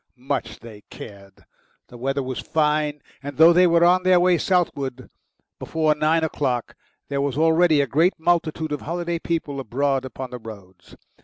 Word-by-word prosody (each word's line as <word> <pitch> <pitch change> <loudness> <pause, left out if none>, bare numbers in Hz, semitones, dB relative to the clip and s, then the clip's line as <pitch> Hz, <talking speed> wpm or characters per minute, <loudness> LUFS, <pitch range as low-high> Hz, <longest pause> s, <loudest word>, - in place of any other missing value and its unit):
Much 125 -3 -4
they 110 -3 -12
cared! 100 -2 -13 0.4
The - - -14
weather 135 +2 -2
was 130 -1 -5
fine, 150 -1 -1 0.2
and 145 -1 -8
though 165 +2 +7
they 180 +1 +5
were 170 0 +4
on 180 +1 +4
their 185 -1 +4
way 175 -1 +3
southward 140 -8 -2 0.5
before 155 -1 0
nine 155 +2 +1
o'clock, 130 -6 -2 0.3
there 140 -1 -1
was 140 -1 -2
already 160 -1 +3
a - - +1
great 160 +8 +2
multitude 160 -2 0
of 150 - -3
holiday 170 +1 -3
people 160 -5 -3
abroad 135 +2 -1
upon 130 0 -8
the 125 - -7
roads. 95 -5 -13
145 Hz, 165 wpm, -22 LUFS, 130-165 Hz, 0.5 s, though